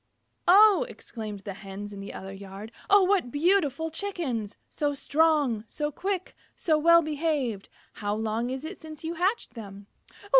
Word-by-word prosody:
"Oh!" 415 Hz, +4 st, +7 dB
exclaimed 215 Hz, -4 st, -7 dB
the 200 Hz, 0 st, -6 dB
Hens 200 Hz, +1 st, -8 dB
in 200 Hz, -, -8 dB
the 195 Hz, -, -7 dB
other 190 Hz, 0 st, -8 dB
yard. 195 Hz, +2 st, -9 dB, 0.2 s
"Oh, 405 Hz, -1 st, +7 dB
what 370 Hz, -8 st, +2 dB
beautiful 320 Hz, 0 st, +1 dB
Chickens! 310 Hz, -, -3 dB
So 290 Hz, -1 st, -1 dB
strong! 290 Hz, -6 st, +2 dB
So 295 Hz, +4 st, -3 dB
quick! 375 Hz, +4 st, -3 dB, 0.2 s
So 315 Hz, -, +2 dB
well 335 Hz, +2 st, +6 dB
behaved! 295 Hz, -9 st, -1 dB, 0.2 s
How 205 Hz, 0 st, -2 dB
long 220 Hz, +2 st, -1 dB
is 265 Hz, +3 st, -4 dB
it 350 Hz, +4 st, -7 dB
since 315 Hz, 0 st, -10 dB
you 325 Hz, +1 st, -2 dB
hatched 370 Hz, +7 st, 0 dB
them?" 200 Hz, -3 st, -9 dB
290 Hz, 155 wpm, -27 LUFS, 210-335 Hz, 0.2 s, Oh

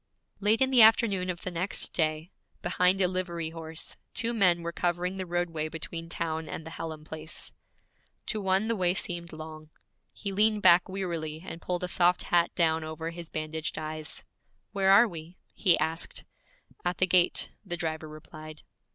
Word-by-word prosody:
Late 210 Hz, +4 st, +2 dB
in 260 Hz, -, +1 dB
the 250 Hz, -3 st, +7 dB
afternoon 215 Hz, -4 st, +5 dB
of 175 Hz, -1 st, -3 dB
the 185 Hz, -, -3 dB
next 180 Hz, +3 st, 0 dB
day, 155 Hz, +1 st, 0 dB, 0.3 s
behind 180 Hz, +2 st, +3 dB
a 185 Hz, -, +5 dB
livery 175 Hz, -3 st, -3 dB
horse, 160 Hz, -1 st, -6 dB, 0.2 s
two 235 Hz, +1 st, +1 dB
men 180 Hz, -6 st, +4 dB
were 170 Hz, -, -3 dB
covering 175 Hz, +2 st, -1 dB
the 185 Hz, -1 st, -4 dB
roadway 170 Hz, -3 st, -1 dB
between 165 Hz, +1 st, -5 dB
town 160 Hz, -2 st, -3 dB
and 160 Hz, -, -6 dB
the 160 Hz, -, -8 dB
Hallam 160 Hz, -2 st, -6 dB
place. 155 Hz, 0 st, -8 dB, 0.7 s
To 215 Hz, -, -1 dB
one 190 Hz, +2 st, +2 dB
the 230 Hz, -, +1 dB
way 180 Hz, -2 st, +2 dB
seemed 170 Hz, -2 st, -2 dB
long. 155 Hz, 0 st, -9 dB, 0.4 s
He 200 Hz, -, -5 dB
leaned 210 Hz, +1 st, +2 dB
back 175 Hz, 0 st, +6 dB
wearily 170 Hz, -4 st, -4 dB
and 165 Hz, -2 st, -7 dB
pulled 180 Hz, 0 st, -2 dB
a -, -, 0 dB
soft 180 Hz, 0 st, +3 dB
hat 175 Hz, -1 st, +3 dB
down 160 Hz, -2 st, +3 dB
over 160 Hz, +1 st, -5 dB
his 170 Hz, -1 st, -8 dB
bandaged 155 Hz, 0 st, -3 dB
eyes. 155 Hz, 0 st, -5 dB, 0.5 s
'Where 195 Hz, -1 st, +1 dB
are 205 Hz, +5 st, +8 dB
we?' 170 Hz, -2 st, -8 dB, 0.2 s
he 180 Hz, -, +3 dB
asked. 160 Hz, +1 st, -2 dB, 0.6 s
'At 175 Hz, 0 st, -1 dB
the 185 Hz, -, +3 dB
gate,' 180 Hz, -1 st, +3 dB
the 175 Hz, -4 st, -3 dB
driver 160 Hz, -2 st, -3 dB
replied. 155 Hz, 0 st, -11 dB
175 Hz, 175 wpm, -28 LUFS, 160-185 Hz, 0.7 s, are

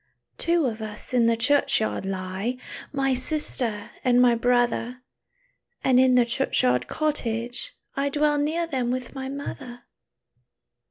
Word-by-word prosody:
"Two 335 Hz, -2 st, +2 dB
of 225 Hz, -3 st, -3 dB
us 215 Hz, +3 st, -7 dB
in 240 Hz, -2 st, +4 dB
the 230 Hz, 0 st, +2 dB
churchyard 275 Hz, -5 st, +2 dB
lie, 190 Hz, +5 st, -3 dB, 0.3 s
My 270 Hz, -1 st, +1 dB
sister 255 Hz, -5 st, -3 dB
and 245 Hz, -1 st, +4 dB
my 250 Hz, -1 st, +6 dB
brother; 245 Hz, +1 st, +1 dB, 0.8 s
And 255 Hz, -1 st, +4 dB
in 255 Hz, -1 st, +5 dB
the 245 Hz, -1 st, +5 dB
churchyard 180 Hz, -, +2 dB
cottage, 245 Hz, -, -2 dB, 0.2 s
I 280 Hz, +1 st, 0 dB
Dwell 295 Hz, +1 st, +2 dB
near 320 Hz, +4 st, 0 dB
them 260 Hz, -7 st, -2 dB
with 255 Hz, 0 st, -3 dB
my 265 Hz, -1 st, -5 dB
mother." 255 Hz, -3 st, -7 dB
250 Hz, 130 wpm, -25 LUFS, 230-280 Hz, 0.8 s, my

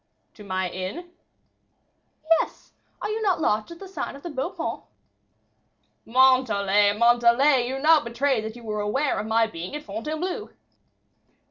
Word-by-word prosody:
"To 210 Hz, -, -13 dB
my 185 Hz, -2 st, -2 dB
inn?" 185 Hz, -, -6 dB, 1.2 s
"Yes; 330 Hz, 0 st, 0 dB, 0.3 s
are -, -, -2 dB
you 440 Hz, +1 st, -3 dB
not 390 Hz, -5 st, +1 dB
lodging 220 Hz, +3 st, 0 dB
at -, -, -18 dB
the 390 Hz, -, -9 dB
sign 380 Hz, -, -5 dB
of 280 Hz, -, -13 dB
the 345 Hz, -, -6 dB
Beau 275 Hz, +3 st, -2 dB
Paon?" -, -, -5 dB, 1.2 s
"Montalais, 215 Hz, -6 st, +3 dB
Montalais, 240 Hz, +3 st, +4 dB
you 265 Hz, +2 st, -3 dB
now 310 Hz, +3 st, +5 dB
betray 255 Hz, 0 st, 0 dB
that 220 Hz, +1 st, -6 dB
you 240 Hz, -, -12 dB
were 210 Hz, -1 st, -3 dB
aware 265 Hz, +8 st, 0 dB
of 215 Hz, -, -4 dB
my 225 Hz, +1 st, +3 dB
being 180 Hz, -, -7 dB
at 300 Hz, -, -6 dB
Fontainebleau." 305 Hz, -, -4 dB
240 Hz, 150 wpm, -25 LUFS, 215-300 Hz, 1.2 s, now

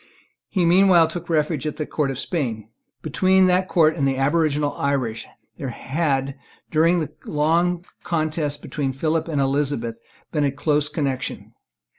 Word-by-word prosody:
He 185 Hz, -3 st, +1 dB
meanwhile 175 Hz, -1 st, +5 dB
took 175 Hz, +1 st, -7 dB
refuge 155 Hz, -2 st, 0 dB
at 150 Hz, -, -4 dB
the 155 Hz, -, -2 dB
court 145 Hz, -2 st, -1 dB
of 135 Hz, -, -3 dB
Spain. 120 Hz, -, -3 dB, 0.3 s
Between 185 Hz, +5 st, +3 dB
that 185 Hz, +1 st, +2 dB
court 160 Hz, -4 st, +3 dB
and 140 Hz, -4 st, +1 dB
the 135 Hz, -1 st, 0 dB
aboriginal 145 Hz, +1 st, +1 dB
Irish 130 Hz, -5 st, -1 dB, 0.3 s
there 135 Hz, -, -3 dB
had, 135 Hz, 0 st, -2 dB, 0.3 s
during 165 Hz, +3 st, +3 dB
the 155 Hz, -, -3 dB, 0.2 s
long 170 Hz, +4 st, +1 dB, 0.2 s
contest 155 Hz, -3 st, -2 dB
between 135 Hz, -3 st, -2 dB
Philip 155 Hz, +4 st, -1 dB
and 155 Hz, -4 st, -1 dB
Elizabeth, 135 Hz, -4 st, 0 dB, 0.3 s
been 150 Hz, -2 st, 0 dB
a 140 Hz, -, +2 dB
close 145 Hz, +1 st, 0 dB
connection. 140 Hz, -4 st, -3 dB
150 Hz, 150 wpm, -22 LUFS, 135-165 Hz, 0.3 s, meanwhile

